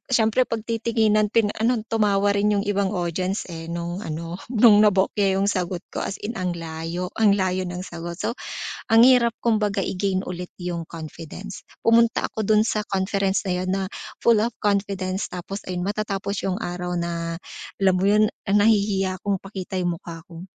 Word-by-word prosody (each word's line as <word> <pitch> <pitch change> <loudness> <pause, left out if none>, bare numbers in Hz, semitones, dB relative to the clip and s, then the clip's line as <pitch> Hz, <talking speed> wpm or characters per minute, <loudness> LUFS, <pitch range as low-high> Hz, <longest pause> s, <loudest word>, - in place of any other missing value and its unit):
siyempre 225 +3 +3
pagtitinginan 220 -1 +1
pin 210 -1 +2
ano 235 +3 +3 0.2
tumawa 205 -2 +3
rin 205 +1 +2
'yung 200 - +1
ibang 200 -1 +1
audience, 180 +3 -1
eh, 165 0 -7
nung 170 +2 -4
ano, 165 0 -5
nung 225 -3 +6
nabokya 195 -1 +3
'yung 200 +1 +2
sagot 180 -1 -2
ko - - -4
as 195 - -3
in 220 -1 -4
ang 180 -1 -1
layo, 165 +2 -4
ang 205 -2 +5
layo 185 -1 0
ng 180 +1 -5
sagot. 170 -1 -6
So - - -2 0.6
ang 225 0 +6
hirap 245 -2 +5
kumbaga 210 -4 +1
i-gain 190 0 -1
ulit 180 -1 -7
'yung 170 -2 -3
confidence. 160 -1 -9 0.2
Pumunta 230 0 +3
ako 220 -2 -3
do'n 215 0 +5
sa 215 -1 -1
conference 195 0 0
na 185 - -2
'yun 185 0 -2
na 195 - -1 0.4
full 230 -2 +5
of 230 +2 0
confidence, 195 -2 0
tapos 180 +3 -7
ayun 180 -1 -3
matatapos 200 -1 -2
'yung 190 +4 -2
araw 180 0 -3
na 170 -1 -2 0.5
alam 190 -1 +5
mo 195 - +1
'yun, 210 +1 +4 0.2
nahihiya 200 -2 +2
kong 200 -1 -2
pakita 190 -1 -7
'yung 175 -2 -1
mukha 165 -1 -9
ko. 170 +3 -9
195 Hz, 170 wpm, -23 LUFS, 180-210 Hz, 0.6 s, nung